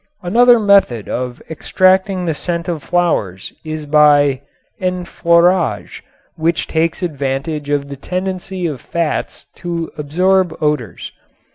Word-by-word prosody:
Another 240 +7 +5
method 200 - +3
of 125 -1 -4
extracting 185 +3 +1
the 165 - 0
scent 170 +3 -4
of 170 -4 -3
flowers 110 - -1
is 155 -1 -5
by 145 -2 +4 0.4
enfleurage, 175 -2 +1 0.3
which 165 +1 0
takes 165 +3 -1
advantage 145 -1 -3
of 145 -1 -1
the 140 0 -8
tendency 185 +3 -4
of 145 -7 -4
fats 170 -3 -3
to 170 -2 -4
absorb 180 +3 +1
odors. 150 - -2
165 Hz, 115 wpm, -17 LUFS, 145-180 Hz, 0.4 s, Another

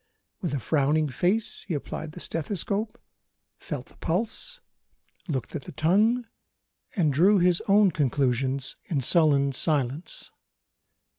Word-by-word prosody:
With 170 -7 -2
a - - -1
frowning 150 +3 +1
face 185 - 0
he 175 - -1
applied 150 +2 -5
the 180 - -9
stethoscope, 200 +6 -2 0.6
felt - - -5
the - - -20
pulse, 225 - -2 0.7
looked 130 -8 -3
at 145 - -5
the - - -8
tongue 215 - +2 0.7
and 160 -8 +2
drew 190 +9 +5
his 180 -1 +3
own 200 -1 +5
conclusions 135 -2 0
in 145 -5 -1
sullen 140 -1 +4
silence. 140 +1 -2
160 Hz, 125 wpm, -26 LUFS, 140-195 Hz, 0.7 s, drew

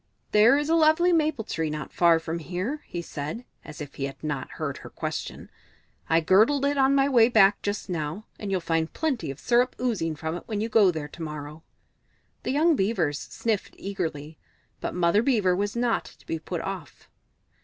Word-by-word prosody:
"There 220 +6 +6
is 295 0 -1
a 325 - +2
lovely 330 +2 +4
maple 310 -7 +1
tree 160 -6 -2
not 150 -2 -5
far 170 -2 +5
from 165 +1 -4
here," 185 - -4
he 175 -1 -5
said, 155 +11 -6 0.2
as 150 - -10
if 145 -1 -7
he 135 - -3
had 135 +1 -8
not 145 -4 -4
heard - - -4
her - - -10
question. - - -5 0.6
"I 165 +1 +4
girdled 220 - +4
it 285 0 +1
on 270 0 +4
my 275 0 +4
way 240 -4 +5
back 205 -4 +5
just 205 +1 -3
now, 170 +3 -4
and 205 - -5
you'll 190 -2 0
find 165 -1 0
plenty 265 - -2
of 135 - -6
syrup 245 +1 +2
oozing 195 -11 -1
from 160 +2 -4
it 175 - -7
if 215 -2 -2
you 220 +2 -1
go 215 -3 +5
there 160 -4 -3
to 170 - -11
morrow." 150 0 -6 0.8
The - - -2
young 315 +4 +4
Beavers 185 - 0
sniffed 220 -4 -3
eagerly, 160 -6 -5 0.4
but - - -4
Mother 180 +3 +3
Beaver 215 -8 +2
was 205 +3 -2
not 235 -1 +1
to - - -16
be 165 - -3
put 165 +1 -4
off. 190 -7 -7
195 Hz, 195 wpm, -26 LUFS, 160-240 Hz, 0.8 s, There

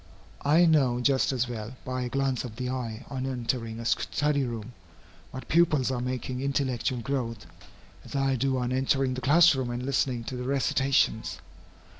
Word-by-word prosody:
I 155 +5 +5
know 135 -7 +3
just 130 +2 +2
as 130 -1 0
well, 115 0 -6
by 130 0 -3
a 125 - -2
glance 135 -1 0
of 120 -4 -7
the 125 +1 -3
eye 120 -3 -4
on 130 -1 -3
entering 120 -3 -3
a 115 - -6
study 145 +4 +1
room, 120 -1 -5 0.6
what 130 -2 -8
pupils 155 -6 +3
are 125 -2 -2
making 125 0 -3
intellectual 130 -3 -1
growth, 115 -4 -3 0.6
as - - -9
I 135 -1 +2
do 130 +1 0
on 125 0 -1
entering 135 0 +1
the 130 - -5
class 160 +6 +6
room 130 -3 -2
and 120 +1 -3
listening 130 -3 0
to 125 - -5
the 125 - -4
recitations. 135 -3 +1
130 Hz, 175 wpm, -27 LUFS, 120-135 Hz, 0.6 s, class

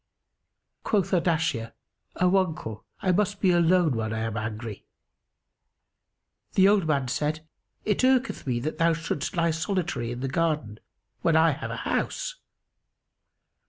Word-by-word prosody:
Quoth 195 -3 +1
Ardashir, 160 -10 +1 0.4
"O 180 +1 +3
uncle, 155 - -2 0.2
I 185 - +3
must 205 +2 +1
be 185 - +3
alone 175 -4 +3
when 110 -1 -2
I 110 - -2
am 115 -1 -2
angry."[FN#281] 110 -1 -11
The 190 0 +6
old 200 -5 +3
man 140 -4 +1
said, 155 +5 -2 0.4
"It 210 -2 +1
irketh 260 - +2
me 120 -2 0
that 155 +5 -4
thou 165 0 +4
shouldst 165 +2 -3
lie 165 0 +3
solitary 160 - -2
in 120 +1 -5
the 135 - -1
garden, 150 -7 -1 0.4
when 165 - +2
I 160 0 +5
have 140 - -5
a - - -4
house." - - -2
160 Hz, 140 wpm, -26 LUFS, 125-185 Hz, 0.4 s, The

